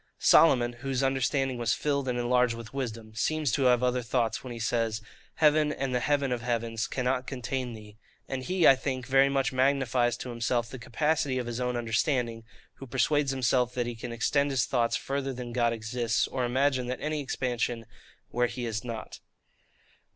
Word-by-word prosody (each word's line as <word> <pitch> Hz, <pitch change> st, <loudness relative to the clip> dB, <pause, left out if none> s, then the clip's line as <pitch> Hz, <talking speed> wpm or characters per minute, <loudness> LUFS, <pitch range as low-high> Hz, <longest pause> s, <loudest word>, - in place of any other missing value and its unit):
Solomon, 120 Hz, -7 st, +5 dB
whose 135 Hz, -1 st, -1 dB
understanding 135 Hz, -1 st, 0 dB
was 115 Hz, -1 st, +1 dB
filled 140 Hz, -2 st, -1 dB
and 125 Hz, -1 st, -1 dB
enlarged 125 Hz, 0 st, +2 dB
with 115 Hz, 0 st, -10 dB
wisdom, 115 Hz, -5 st, -5 dB
seems 150 Hz, +3 st, 0 dB
to 135 Hz, +3 st, +1 dB
have 125 Hz, -1 st, +4 dB
other 125 Hz, 0 st, +1 dB
thoughts 120 Hz, -1 st, -1 dB
when 130 Hz, -, -7 dB
he 120 Hz, -, -6 dB
says, 115 Hz, -1 st, 0 dB, 0.4 s
'Heaven, 150 Hz, -1 st, +4 dB
and 135 Hz, -3 st, -3 dB
the 125 Hz, -, +2 dB
heaven 140 Hz, 0 st, +1 dB
of 120 Hz, -1 st, -1 dB
heavens, 115 Hz, -1 st, -2 dB
cannot 130 Hz, 0 st, -1 dB
contain 130 Hz, -1 st, -3 dB
thee.' 105 Hz, -1 st, -12 dB, 0.3 s
And 135 Hz, -1 st, -3 dB
he, 180 Hz, +4 st, +2 dB
I 135 Hz, -, +8 dB
think, 130 Hz, -1 st, -3 dB
very 135 Hz, +1 st, +4 dB
much 135 Hz, -1 st, 0 dB
magnifies 130 Hz, -2 st, +2 dB
to 125 Hz, -, -6 dB
himself 120 Hz, 0 st, -1 dB
the 130 Hz, -, -7 dB
capacity 145 Hz, +1 st, 0 dB
of 125 Hz, -, -2 dB
his 120 Hz, 0 st, -4 dB
own 125 Hz, -1 st, -1 dB
understanding, 115 Hz, 0 st, -1 dB, 0.3 s
who 135 Hz, -, -9 dB
persuades 145 Hz, +4 st, +1 dB
himself 125 Hz, -2 st, +1 dB
that 120 Hz, -1 st, 0 dB
he 120 Hz, -, -3 dB
can 120 Hz, +1 st, -7 dB
extend 140 Hz, +5 st, +1 dB
his 130 Hz, -4 st, +1 dB
thoughts 120 Hz, -3 st, +1 dB
further 135 Hz, -1 st, -2 dB
than 125 Hz, -1 st, -7 dB
God 120 Hz, -1 st, +2 dB
exists, 115 Hz, +1 st, -1 dB
or 130 Hz, -2 st, -2 dB
imagine 130 Hz, 0 st, +1 dB
any 150 Hz, +3 st, -3 dB
expansion 120 Hz, -3 st, -2 dB, 0.5 s
where 120 Hz, 0 st, +2 dB
He 120 Hz, +1 st, -5 dB
is 110 Hz, -1 st, -3 dB
not. 115 Hz, -3 st, -7 dB
125 Hz, 185 wpm, -28 LUFS, 120-135 Hz, 0.5 s, I